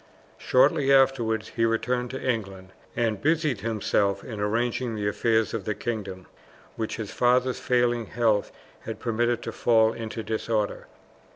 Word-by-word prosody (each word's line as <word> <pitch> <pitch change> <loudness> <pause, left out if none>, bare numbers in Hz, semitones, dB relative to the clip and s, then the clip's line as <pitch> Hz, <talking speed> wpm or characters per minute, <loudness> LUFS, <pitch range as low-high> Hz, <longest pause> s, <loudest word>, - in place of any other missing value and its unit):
Shortly 140 +2 +3
afterwards 120 -5 +3
he 115 - -2
returned 125 +2 0
to 130 - -5
England, 95 -6 -3 0.3
and 110 -4 0
busied 155 -8 +1
himself 100 -2 0
in 110 -4 -7
arranging 115 +3 -1
the 105 -1 -2
affairs 110 +1 +1
of 115 -3 -3
the 105 - -1
kingdom, 100 -5 -5 0.5
which 110 -1 -3
his 110 -4 -6
father's 125 +1 +2
failing 120 -2 +1
health 110 -3 +1 0.3
had - - -7
permitted 120 +1 0
to - - -4
fall 110 -1 +3
into 115 0 -6
disorder. 110 -1 -2
115 Hz, 145 wpm, -26 LUFS, 110-120 Hz, 0.5 s, Shortly